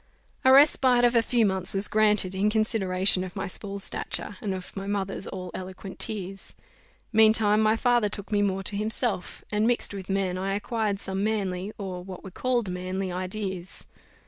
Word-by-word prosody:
A 260 - +6
respite 265 -3 +6
of 240 - +3
a 230 - +6
few 230 0 +2
months 190 -1 +1
was 195 +1 +1
granted, 210 -3 +3
in 195 +2 +1
consideration 195 -4 +2
of 185 -1 -8
my - - -3
small 200 +2 -4
stature, 200 +1 -3
and 205 - -2
of 185 -1 -6
my 195 0 -5
mother's 195 -1 -2
all 185 -2 -6
eloquent 185 +1 -8
tears. 195 -2 -3 0.6
Meantime 215 -1 +5
my 215 0 +4
father 240 -2 +2
took 200 +1 -6
me 205 -1 +2
more 195 -1 0
to 200 - -1
himself; 215 -1 -2
and, 210 +1 +2
mixed 240 -3 0
with 195 -1 -7
men, 190 -2 0
I 195 +1 -1
acquired 210 -1 -1
some 195 0 -3
manly, 200 -3 -1
or 185 -3 -5
what 185 -1 -9
were 190 - -9
called 245 +1 0
manly, 185 +1 -3
ideas. 185 0 -4
200 Hz, 180 wpm, -26 LUFS, 190-215 Hz, 0.6 s, A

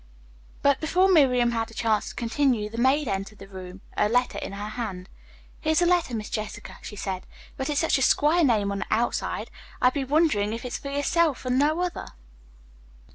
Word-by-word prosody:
But 280 -1 +3
before 365 +4 +3
Miriam 250 -7 +4
had 225 -1 -2
a 225 - -14
chance 220 -2 0
to - - -10
continue, 235 -3 0
the 230 - -5
maid 270 +3 +3
entered 195 +1 -3
the 195 - -11
room, 185 -1 -10
a 210 - +2
letter 245 +2 +1
in - - -6
her 205 +1 -5
hand. 205 -5 -5 0.5
"Here's 315 +1 +2
a 350 - +3
letter, 345 -8 +2
Miss 215 -1 -5
Jessica," 215 -1 -5
she 210 - -8
said. 190 -2 -4 0.3
"But 265 +2 -3
it's 295 0 +1
such 325 -4 +2
a 265 - +5
quare 320 +4 +3
name 215 -7 +2
on 200 - -3
the - - -4
outside, 230 +2 -1 0.3
I 250 - +4
be 275 +1 -2
wondering 265 -8 +2
if 230 +2 -6
it's 245 - -4
fur 280 - -6
yerself 285 +1 +1
and 255 +1 +1
no 305 +4 +2
other?" 360 -1 -3
245 Hz, 200 wpm, -26 LUFS, 210-295 Hz, 0.5 s, a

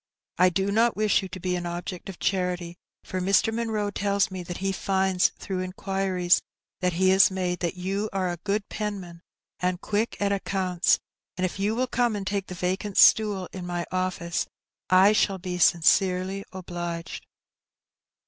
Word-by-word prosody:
I 180 0 +6
do 195 +2 -1
not 230 +3 +3
wish 215 -1 +3
you 190 - -5
to 185 +1 -7
be 180 0 -1
an 175 -1 -3
object 175 +2 -6
of 190 - -8
charity, 180 -2 -1 0.3
for 185 - -4
Mr. 195 +4 +3
Munroe 220 -3 -1
tells 200 0 0
me 185 -1 -5
that 175 0 -6
he 195 0 -1
finds, 190 -1 +1
through 190 -2 -4
inquiries 185 -1 +1 0.4
that 180 -1 0
he 185 +2 +3
has 190 0 +6
made, 180 -2 -2
that 175 0 -2
you 195 +4 -2
are 185 -2 -1
a 175 - -5
good 200 +4 -2
penman, 190 -5 -5 0.4
and 180 0 0
quick 215 +4 -2
at 200 0 +1
accounts, 185 -3 +1 0.4
and 185 - +1
if 185 - -4
you 205 +3 +1
will 255 +2 +1
come 240 -2 0
and 200 -1 -4
take 195 0 -2
the 180 - -7
vacant 185 +3 -2
stool 205 -4 +5
in 185 - -6
my 175 -1 -2
office, 185 -2 -1 0.4
I 185 +2 +6
shall 200 -2 +2
be 180 -1 -5
sincerely 185 +3 +3
obliged. 175 -2 -6
185 Hz, 175 wpm, -26 LUFS, 180-200 Hz, 0.4 s, I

